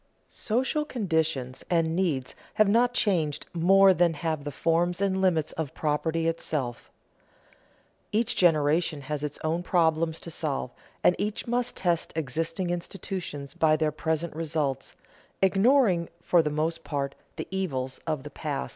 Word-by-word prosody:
Social 260 Hz, +7 st, 0 dB
conditions 160 Hz, -, -1 dB
and 165 Hz, -2 st, +2 dB
needs 155 Hz, -9 st, 0 dB, 0.2 s
have 215 Hz, -, +5 dB
not 235 Hz, +4 st, +4 dB
changed 165 Hz, -, +1 dB
more 190 Hz, +3 st, +6 dB
than 170 Hz, -2 st, +2 dB
have 155 Hz, -1 st, -2 dB
the 145 Hz, -, -3 dB
forms 170 Hz, +4 st, +1 dB
and 190 Hz, -1 st, +1 dB
limits 165 Hz, -5 st, +2 dB
of 160 Hz, -4 st, -5 dB
property 160 Hz, +2 st, 0 dB
itself. 150 Hz, -7 st, -3 dB, 1.2 s
Each 225 Hz, +2 st, +1 dB
generation 155 Hz, -2 st, +3 dB
has 150 Hz, +1 st, -4 dB
its 150 Hz, -1 st, -4 dB
own 160 Hz, +2 st, 0 dB
problems 165 Hz, -2 st, +1 dB
to 170 Hz, -, -7 dB
solve, 145 Hz, -6 st, -2 dB, 0.3 s
and 180 Hz, -, +5 dB
each 210 Hz, 0 st, -2 dB
must 245 Hz, +1 st, -1 dB
test 175 Hz, -3 st, 0 dB
existing 165 Hz, +4 st, -2 dB
institutions 175 Hz, -5 st, -5 dB
by 155 Hz, -1 st, +3 dB
their 155 Hz, 0 st, +1 dB
present 160 Hz, +1 st, -2 dB
results, 155 Hz, -4 st, -2 dB, 0.4 s
ignoring 195 Hz, -2 st, +3 dB
for 175 Hz, 0 st, +3 dB
the 150 Hz, -, -1 dB
most 155 Hz, +2 st, -1 dB
part 140 Hz, -2 st, -2 dB, 0.2 s
the -, -, -5 dB
evils 130 Hz, -9 st, -2 dB
of 155 Hz, -4 st, -1 dB
the 150 Hz, -, -8 dB
past. 145 Hz, -1 st, -3 dB
165 Hz, 145 wpm, -27 LUFS, 150-185 Hz, 1.2 s, more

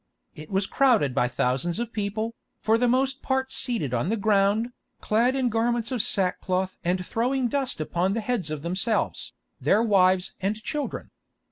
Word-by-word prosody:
It 155 Hz, 0 st, -11 dB
was 195 Hz, 0 st, +1 dB
crowded 230 Hz, -, +3 dB
by 125 Hz, -2 st, +2 dB
thousands 130 Hz, +8 st, -1 dB
of 235 Hz, 0 st, -4 dB
people, 215 Hz, +2 st, -2 dB, 0.3 s
for 225 Hz, +1 st, +2 dB
the 245 Hz, -, +3 dB
most 265 Hz, +2 st, +1 dB
part 265 Hz, 0 st, -1 dB
seated 220 Hz, -, -1 dB
on 120 Hz, +8 st, 0 dB
the 225 Hz, -, 0 dB
ground, 205 Hz, +2 st, +2 dB, 0.3 s
clad 235 Hz, +5 st, +2 dB
in 260 Hz, -2 st, +1 dB
garments 235 Hz, +1 st, 0 dB
of 250 Hz, -4 st, +1 dB
sack 185 Hz, -3 st, 0 dB
cloth 185 Hz, 0 st, -1 dB
and 180 Hz, +1 st, 0 dB
throwing 250 Hz, +4 st, 0 dB
dust 270 Hz, -, -1 dB
upon 175 Hz, +5 st, 0 dB
the 230 Hz, -, -1 dB
heads 215 Hz, -7 st, -2 dB
of 155 Hz, -1 st, -5 dB
themselves, 195 Hz, +6 st, -1 dB, 0.3 s
their 215 Hz, +3 st, +3 dB
wives 190 Hz, -4 st, +3 dB
and 195 Hz, +3 st, 0 dB
children. 295 Hz, +2 st, -4 dB
215 Hz, 170 wpm, -26 LUFS, 185-240 Hz, 0.3 s, crowded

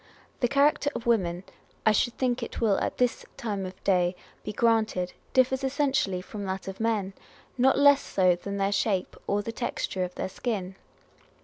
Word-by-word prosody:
The 245 Hz, -, +2 dB
character 285 Hz, +2 st, +3 dB
of 235 Hz, -, -5 dB
women 185 Hz, -7 st, +1 dB, 0.4 s
(I 220 Hz, -, +6 dB
should 235 Hz, +3 st, +1 dB
think 255 Hz, -1 st, 0 dB
it 235 Hz, -, -5 dB
will 215 Hz, -4 st, +2 dB
at -, -, -2 dB
this 250 Hz, -1 st, +1 dB
time 200 Hz, -4 st, -3 dB
of 185 Hz, 0 st, -12 dB
day 180 Hz, -2 st, +2 dB, 0.3 s
be -, -, -4 dB
granted) 220 Hz, -5 st, +1 dB, 0.2 s
differs 260 Hz, +1 st, +2 dB
essentially 265 Hz, -9 st, +1 dB
from 205 Hz, +1 st, -7 dB
that 190 Hz, 0 st, -4 dB
of 195 Hz, 0 st, -6 dB
men, 215 Hz, -4 st, 0 dB, 0.4 s
not 265 Hz, +1 st, +4 dB
less 285 Hz, 0 st, +6 dB
so 185 Hz, -2 st, +2 dB
than 200 Hz, +3 st, -5 dB
their 195 Hz, 0 st, +1 dB
shape 200 Hz, -2 st, 0 dB
or 205 Hz, +1 st, 0 dB
the 230 Hz, -, -4 dB
texture 225 Hz, -5 st, -2 dB
of 180 Hz, 0 st, -5 dB
their -, -, -3 dB
skin. 190 Hz, -3 st, -3 dB
215 Hz, 180 wpm, -27 LUFS, 190-245 Hz, 0.4 s, I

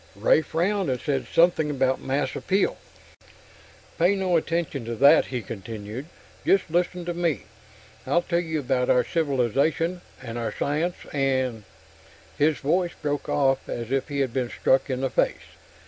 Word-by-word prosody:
Ray -, -, +4 dB
frowned, 190 Hz, +1 st, 0 dB
and 125 Hz, -1 st, -1 dB
said 135 Hz, 0 st, -2 dB
something 165 Hz, -3 st, +3 dB
about 130 Hz, -2 st, +1 dB
mass 135 Hz, 0 st, -1 dB
appeal. 195 Hz, +2 st, 0 dB, 1.2 s
"Pay 180 Hz, +4 st, +4 dB
no 190 Hz, -2 st, +1 dB
attention 165 Hz, -5 st, -1 dB
to 115 Hz, 0 st, -3 dB
that," 140 Hz, +6 st, +6 dB
he 125 Hz, -3 st, -4 dB
continued. 110 Hz, -, -7 dB, 0.4 s
"Just 195 Hz, -4 st, +2 dB
listen 175 Hz, +1 st, 0 dB
to 175 Hz, -, -2 dB
me. 170 Hz, -4 st, -1 dB, 0.6 s
I'll 175 Hz, -, +2 dB
tell 170 Hz, -1 st, 0 dB
you 160 Hz, -3 st, -2 dB
about 125 Hz, -1 st, 0 dB
our 125 Hz, -, +4 dB
civilization, 155 Hz, +4 st, 0 dB, 0.2 s
and 120 Hz, -2 st, -6 dB
our 115 Hz, -, -2 dB
science, 160 Hz, +5 st, 0 dB, 0.2 s
and...." 130 Hz, -6 st, 0 dB, 0.7 s
His 150 Hz, 0 st, +2 dB
voice 175 Hz, +7 st, 0 dB
broke 145 Hz, -1 st, -3 dB
off 135 Hz, -2 st, +1 dB
as 120 Hz, 0 st, -4 dB
if 135 Hz, -1 st, 0 dB
he 140 Hz, -2 st, -2 dB
had 130 Hz, -4 st, -1 dB
been 125 Hz, -2 st, -1 dB
struck 130 Hz, +3 st, +1 dB
in 130 Hz, -1 st, -2 dB
the 135 Hz, -, -1 dB
face. -, -, 0 dB
140 Hz, 160 wpm, -25 LUFS, 130-170 Hz, 1.2 s, that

